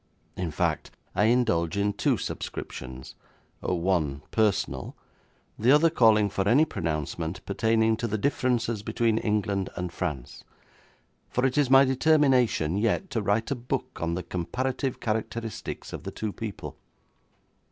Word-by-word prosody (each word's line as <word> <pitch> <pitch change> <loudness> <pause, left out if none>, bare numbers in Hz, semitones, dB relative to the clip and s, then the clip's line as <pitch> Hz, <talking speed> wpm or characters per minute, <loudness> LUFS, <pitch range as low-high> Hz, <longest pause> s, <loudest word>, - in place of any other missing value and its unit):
In 90 -2 -2
fact, 75 - -1 0.2
I 105 - +2
indulge 105 -8 +2
in 100 0 +1
two - - +1
subscriptions 65 0 -6 0.5
one 85 -5 0
personal; 100 - 0 0.6
the 115 - +2
other 155 +3 +5
calling 110 -8 +5
for 100 0 -1
any 145 +7 +5
pronouncement 80 - -3
pertaining 110 +2 +2
to 120 0 -2
the 110 0 -1
differences 120 -4 0
between 115 +1 +1
England 105 -3 0
and 90 -1 -4
France; 75 -10 -5 0.9
for 125 - 0
it 130 - +1
is 145 -3 +2
my 135 +1 +7
determination 130 - +3
yet 115 - 0
to 115 -4 0
write 105 +5 0
a - - +1
book 120 0 -4
on 85 0 -1
the 90 - -3
comparative 125 - -2
characteristics 110 0 -4
of - - -5
the - - -6
two 110 -2 -4
people. 110 -4 -7
110 Hz, 140 wpm, -27 LUFS, 90-125 Hz, 0.9 s, my